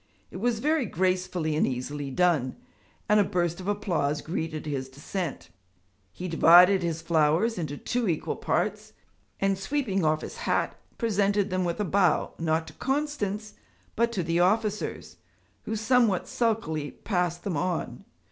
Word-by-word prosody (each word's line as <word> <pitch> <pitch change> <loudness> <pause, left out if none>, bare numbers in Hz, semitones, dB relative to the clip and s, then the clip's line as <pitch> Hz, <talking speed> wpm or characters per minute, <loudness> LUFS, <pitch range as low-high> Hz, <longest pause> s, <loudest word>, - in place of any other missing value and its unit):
It - - -7
was 230 +3 0
very 300 +1 +1
gracefully 180 -3 0
and 155 - +2
easily 135 +3 -4
done, 150 -3 +1 0.5
and 210 -1 +5
a - - +6
burst 175 -2 -1
of 185 - -7
applause 165 -8 0
greeted 160 -2 -4
his 135 -3 -3
descent. 145 - -5 0.6
He 180 - -6
divided 180 +3 +7
his 165 -2 -2
flowers 165 +7 +2
into 145 -3 -4
two 245 +6 -1
equal 160 - -1
parts, - - -1 0.5
and 195 -1 +1
sweeping 195 - -1
off 155 0 +2
his 470 - -7
hat, 475 - 0 0.2
presented 205 -3 +1
them 185 0 0
with 170 +3 -2
a 210 - 0
bow, 185 -2 +2
not 160 0 0
to - - -12
Constance, 265 -8 -2 0.4
but 235 +1 +2
to 190 -6 -1
the 165 +1 0
officers, 210 +3 0 0.5
who 220 - -2
somewhat 220 -3 +2
sulkily 185 -11 -1
passed 175 -4 -2
them 190 -5 -2
on. 175 +2 -2
180 Hz, 150 wpm, -27 LUFS, 160-210 Hz, 0.6 s, divided